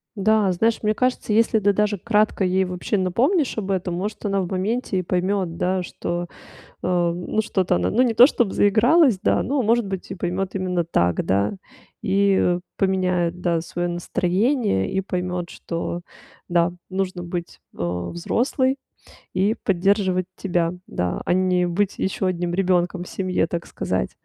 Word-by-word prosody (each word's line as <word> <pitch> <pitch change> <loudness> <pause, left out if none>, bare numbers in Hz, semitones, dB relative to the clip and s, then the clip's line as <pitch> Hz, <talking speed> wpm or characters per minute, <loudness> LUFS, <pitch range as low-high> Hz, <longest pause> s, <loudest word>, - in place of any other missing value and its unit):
Да, 210 -1 +3
знаешь, 225 +6 +1
мне 215 0 +1
кажется, 255 -2 0
если 225 +1 +3
ты 205 0 +3
даже 210 0 +1
кратко 210 +1 +1
ей 190 +1 +2
вообще 180 +3 -2
напомнишь 245 - +1
об 200 -3 -3
этом, 185 -2 -1
может, 205 +5 -4
она 200 -1 +1
в 180 - -4
моменте 200 +3 -1
и - - +1
поймёт, 180 -1 -1
да, 185 +1 0
что, 175 0 -4 0.6
а, 175 -1 +1
ну, 175 +5 -2
что-то 190 -4 0
она, - - 0
ну, 240 - +3
не 240 -3 +2
то 240 +3 +9
чтоб 240 -8 0
заигралась, 235 - +4
да, - - +2
но, 280 +2 0
может 230 0 +2
быть, 190 -2 -5
и - - -3
поймёт 185 +1 -3
именно 180 -2 -1
так, 90 - +1
да. 100 - +1 0.5
И, 195 0 +3
э, 175 0 +2 0.2
поменяет, 180 -2 0
да, 170 -2 +1
своё 175 +1 -3
настроение 180 - 0
и 190 - 0
поймёт, 180 -2 -3
что, 170 +1 -4 0.5
да, 170 -1 +2 0.2
нужно 185 -1 -2
быть, 175 0 -5 0.2
э, 90 0 -3
взрослой 260 - 0 0.6
и 205 +5 +1
поддерживать 190 -1 +2
тебя, 175 -3 0
да, 90 0 -2
а - - 0
не 180 -1 +2
быть 190 +3 0
ещё 190 0 -1
1 175 -1 -1
ребёнком 180 -1 +1
в - - -11
семье, 185 -3 0
так 170 0 -4
сказать. - - -2
185 Hz, 165 wpm, -22 LUFS, 175-205 Hz, 0.6 s, то